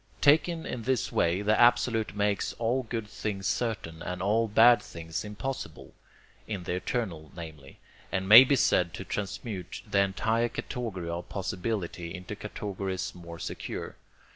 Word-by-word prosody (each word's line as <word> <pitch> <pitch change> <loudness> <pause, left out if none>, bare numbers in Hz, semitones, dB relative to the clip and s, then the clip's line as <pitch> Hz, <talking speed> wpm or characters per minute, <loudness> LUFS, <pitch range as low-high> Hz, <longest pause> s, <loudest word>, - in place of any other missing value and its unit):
Taken 160 +3 +4
in 125 - -4
this 130 0 0
way, 90 +4 +1
the 105 +1 +3
absolute 115 -3 +3
makes 100 -1 0
all 120 +3 0
good 115 -3 -4
things 105 -2 -4
certain, 95 -6 -2
and 90 +1 -4
all 110 +5 +2
bad 115 +3 +6
things 85 +2 -6
impossible 105 +6 -6 0.5
(in 100 -5 -4
the 90 - -3
eternal, 90 -5 -3
namely), 75 -5 -10 0.3
and 95 0 -1
may 110 +6 +12
be 140 +2 +3
said 90 -8 +2
to 95 - -7
transmute 100 -1 -5
the 100 - +1
entire 110 +4 +1
category 110 -11 -5
of 85 +1 -5
possibility 90 -2 -3
into 90 +3 -7
categories 100 -2 -4
more 85 -1 -10
secure. 75 - -5
100 Hz, 145 wpm, -29 LUFS, 90-115 Hz, 0.5 s, may